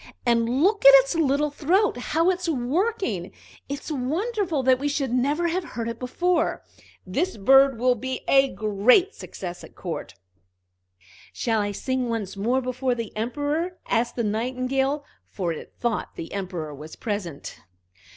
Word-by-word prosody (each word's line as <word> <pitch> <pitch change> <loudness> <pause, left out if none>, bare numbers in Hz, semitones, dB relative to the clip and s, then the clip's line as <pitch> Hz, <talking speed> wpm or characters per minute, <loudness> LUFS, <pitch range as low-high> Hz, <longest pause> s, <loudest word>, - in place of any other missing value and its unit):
"And 235 +3 +2
look 410 +3 +2
at 275 - +11
its 275 +2 +5
little 295 -2 +1
throat, 365 +9 +2
how 325 +8 +1
it's 360 -1 -3
working! 270 - -1 0.4
It's 280 +3 -5
wonderful 325 - -1
that 255 0 +4
we 285 - -1
should 275 -4 -1
never 290 +7 +1
have 360 +3 -1
heard 235 -8 -5
it 230 0 -5
before. 345 +7 0 0.4
That 210 - -2
bird 270 0 +6
will 250 +2 +3
be 260 +2 -4
a 270 0 +5
great 220 - +3
success 175 -2 -8
at - - -13
court." 165 - -6 1.2
"Shall 225 -3 0
I 205 0 -1
sing 255 +4 -2
once 210 -4 -3
more 240 +7 +1
before 255 0 -1
the 230 -3 -6
Emperor?" 290 +10 -2
asked 235 +1 +1
the 235 - -1
Nightingale, 255 +6 -1 0.2
for 175 -4 -3
it 155 - -10
thought 235 -3 -2
the 165 - -7
Emperor 180 -6 -4
was 150 +3 -10
present. 200 -9 -5
255 Hz, 150 wpm, -25 LUFS, 220-300 Hz, 1.2 s, at